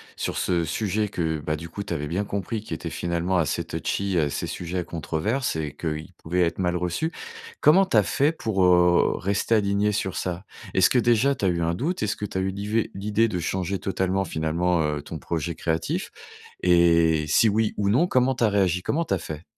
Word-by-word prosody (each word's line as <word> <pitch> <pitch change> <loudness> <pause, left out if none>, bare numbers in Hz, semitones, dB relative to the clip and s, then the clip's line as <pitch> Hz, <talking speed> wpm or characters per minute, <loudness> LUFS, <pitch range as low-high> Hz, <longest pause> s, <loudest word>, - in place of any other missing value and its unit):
sur - - -3
ce 85 -3 +1
sujet 105 +5 -1
que, 80 -4 -2
bah, 75 +1 -2
du 85 +2 -8
coup, 100 +4 -5
tu - - -4
avais 75 +1 -3
bien 95 +7 -1
compris, 100 +2 -3
qui - - -6
était - - -4
finalement 85 +2 -1
assez 80 -4 0
touchy, 100 -2 -2
heu, 80 - +3
assez 70 - -2
sujet 90 +1 -4
à - - -2
controverses 85 - -2
et 75 -3 -4
qu'il 80 +2 -4
pouvait 90 +3 -1
être 85 -1 +1
mal 90 -2 0
reçu? 90 - -1 0.5
Comment 190 +6 +6
tu 120 - -2
as 105 - +7
fait 140 - +2
pour, 110 - -1
heu, 90 -1 +4
rester 100 +4 0
alignée 100 0 +2
sur 95 -2 -2
ça? 90 +1 -3 0.3
Est-ce 95 - +5
que, - - +2
déjà, 120 +4 +3
tu 100 - -2
as - - +4
eu 85 -1 -1
un 85 +1 0
doute? 160 - -2
Est-ce 105 0 0
que 105 - -4
tu 95 -1 -3
as - - 0
eu 95 - 0
l'ivé 105 +3 -1
l'idée 105 +3 +1
de 95 -5 -3
changer 95 +2 -2
totalement, 95 0 -1
finalement, 85 +2 0
heu, 75 -1 -1
ton 80 +1 -7
projet 85 +1 -3
créatif? 80 0 -2 0.5
Et 85 -3 +4
si 110 +9 +4
oui 110 +1 0
ou 100 -1 +1
non, 155 +12 +3
comment 130 -2 +2
tu 120 - -2
as 110 - +4
réagi? 95 -3 +1
Comment 165 - -1
tu - - -1
as 95 - 0
fait? 80 +1 -7
90 Hz, 225 wpm, -25 LUFS, 85-105 Hz, 0.5 s, as